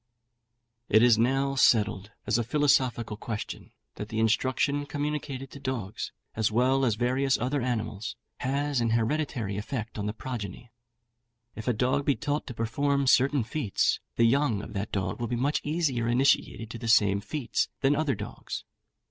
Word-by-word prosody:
It 110 +2 +6
is 120 -3 +6
now 135 +3 +2
settled, 105 -6 +3 0.2
as 110 +2 +2
a - - +1
philosophical 125 -5 +1
question, 110 -1 -6 0.3
that 105 - -5
the 110 - -4
instruction 130 +6 +1
communicated 145 -2 -3
to 140 - -10
dogs, 120 -7 -4 0.2
as 110 0 +1
well 130 +4 +3
as 115 -4 +2
various 130 +3 +1
other 130 +4 -1
animals, 110 -3 -3 0.2
has 140 0 0
an 115 - +1
hereditary 115 -5 -1
effect 110 +1 -4
on 105 - -2
the 105 - -2
progeny. 115 -1 -6 0.8
If 110 - -7
a 125 - +3
dog 125 +5 +1
be 140 - +3
taught 145 +1 -2
to 125 - -6
perform 140 +5 0
certain 135 0 +4
feats, 125 -3 0 0.2
the 115 - +4
young 120 -4 +2
of - - -9
that 100 +1 -3
dog 95 0 -2
will 120 - -2
be 120 - -2
much 140 +5 0
easier 145 -7 0
initiated 120 -2 +1
in 115 - -8
the 115 - -4
same 100 -3 +4
feats 125 +4 -2
than 140 +2 +3
other 145 -4 +1
dogs. - - -6
125 Hz, 165 wpm, -28 LUFS, 110-140 Hz, 0.8 s, It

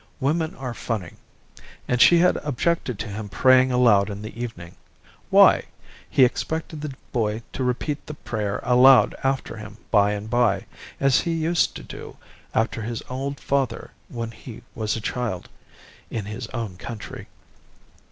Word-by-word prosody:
Women 155 +4 0
are 130 -2 -5
funny. 105 -8 -4 0.7
And 125 -1 +1
she 175 - +8
had 180 +2 +4
objected 145 -3 -1
to 105 - -5
him 105 +1 -6
praying 130 +4 +5
aloud 115 -5 +4
in 100 0 -6
the 110 - -8
evening. 85 -8 -6 0.6
Why? - - +6 0.4
He 130 - +6
expected 160 +4 -3
the 150 -3 -5 0.2
boy 110 -2 -1
to 130 - -2
repeat 130 +4 -2
the 150 - -6
prayer 105 -7 -3
aloud 125 +1 +6
after 135 0 -1
him 105 0 -9
by 105 -1 +4
and 105 +1 -5
by, 110 -5 +2 0.3
as 135 -1 +4
he 170 - -1
used 165 +2 +1
to - - -8
do - - -10 0.4
after 115 0 0
his 115 +1 -4
old 135 +2 -3
father 135 -3 -1 0.2
when 115 -1 -5
he 110 +1 -11
was 110 -2 -2
a 115 - -4
child 115 -6 -3 0.6
in 110 -4 -4
his 110 +3 -6
own 110 -7 -5
country. 115 +3 -8
120 Hz, 155 wpm, -24 LUFS, 105-135 Hz, 0.7 s, she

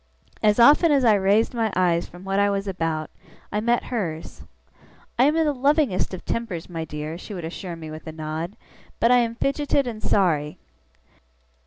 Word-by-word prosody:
As 210 -1 +3
often 295 +7 +6
as 275 -3 +3
I 220 - +6
raised 205 +4 +2
my 225 -3 0
eyes 175 -2 +1
from 175 +1 -13
what 195 +1 -1
I 200 0 +3
was 200 0 -2
about, 165 -4 -2 0.4
I 210 - 0
met 235 +2 +1
hers. 160 - -4 0.8
'I - - +6
am 300 +2 +3
in 325 - +3
the 295 - +1
lovingest 275 - +1
of 185 -1 -8
tempers, 210 -8 -4
my 165 -2 -5
dear,' 150 +2 -6
she 205 - -8
would 175 -3 -5
assure 170 +1 -6
me 160 -1 -9
with 155 +1 -9
a - - -4
nod, 160 +4 -5 0.4
'but 230 - +4
I 250 - +6
am 230 -1 -1
fidgeted 280 +2 0
and 225 -3 -5
sorry! 155 -6 +1
195 Hz, 190 wpm, -23 LUFS, 165-235 Hz, 0.8 s, often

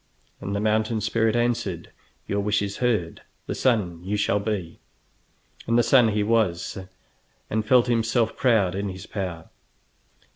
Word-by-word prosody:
And 100 - -4
the - - 0
mountain 110 +1 +1
spirit 110 +2 +1
answered: 115 -8 -1 0.4
"Your 100 - -1
wish 105 0 +1
is 100 0 -4
heard; 110 -9 -1 0.2
the - - -3
sun 95 -10 0
you 100 +3 -2
shall 105 0 +1
be." 100 -5 -4 0.9
And 115 +1 +2
the 120 - +4
sun 120 0 +5
he 105 -1 +1
was, 105 -6 0 0.8
and 110 0 0
felt 125 -1 +5
himself 115 -1 +1
proud 110 -8 +2
in 100 +1 -3
his 95 0 -8
power. 90 -5 -6
105 Hz, 150 wpm, -24 LUFS, 100-115 Hz, 0.9 s, sun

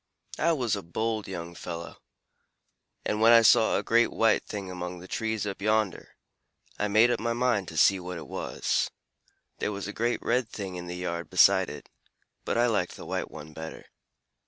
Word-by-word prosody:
"I 165 +2 +3
was 125 -8 0
a 100 - -5
bold 110 +5 -2
young 85 -2 -6
fellow, 85 0 -7 1.1
and 105 - -1
when 115 +1 +7
I 115 -1 +8
saw 110 +1 +5
a - - -2
great 115 +1 +3
white 115 -1 +3
thing 100 -3 -6
among 90 0 -5
the 90 +1 -11
trees 110 +1 -2
up 100 -1 -5
yonder, 110 -2 0 0.6
I 105 - +1
made 110 +4 +5
up 120 - 0
my 115 0 -1
mind 120 -6 +1
to 80 - -7
see 95 +4 +5
what 90 0 -6
it 80 - -8
was. - - -1 0.7
There - - -1
was 100 -1 -5
a 105 - -5
great 120 +2 0
red 125 -1 +1
thing 100 -4 -6
in 90 0 -6
the 90 +1 -5
yard 85 -1 -4
beside - - +5
it, - - -9 0.6
but - - -1
I 120 - +4
liked 105 -7 0
the - - -10
white - - -3
one 75 +1 -10
better. 80 +1 -8
105 Hz, 195 wpm, -28 LUFS, 90-115 Hz, 1.1 s, I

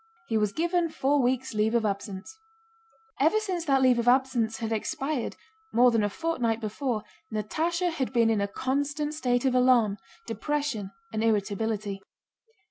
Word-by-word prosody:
He 225 - -2
was 210 -1 +1
given 340 - 0
four 285 -1 +1
weeks' 260 +1 0
leave 215 +2 +1
of 230 -2 +2
absence. 200 - -4 0.8
Ever 320 +10 +4
since 370 -6 -3
that 270 -3 +3
leave 250 -2 +5
of 235 - -1
absence 245 -3 +2
had 225 -1 -4
expired, 270 +4 -2 0.4
more 245 +1 +5
than 225 -2 +2
a 205 - +1
fortnight 240 -4 -1
before, 225 +1 -2 0.3
Natásha 330 - -1
had 275 -6 -2
been 230 -3 +3
in 215 -2 +1
a 200 - 0
constant 285 +6 -2
state 250 -4 0
of 260 - +3
alarm, 250 -5 +4 0.3
depression, 290 -9 -2 0.2
and 220 0 -1
irritability. 210 -1 -1
245 Hz, 155 wpm, -27 LUFS, 220-290 Hz, 0.8 s, leave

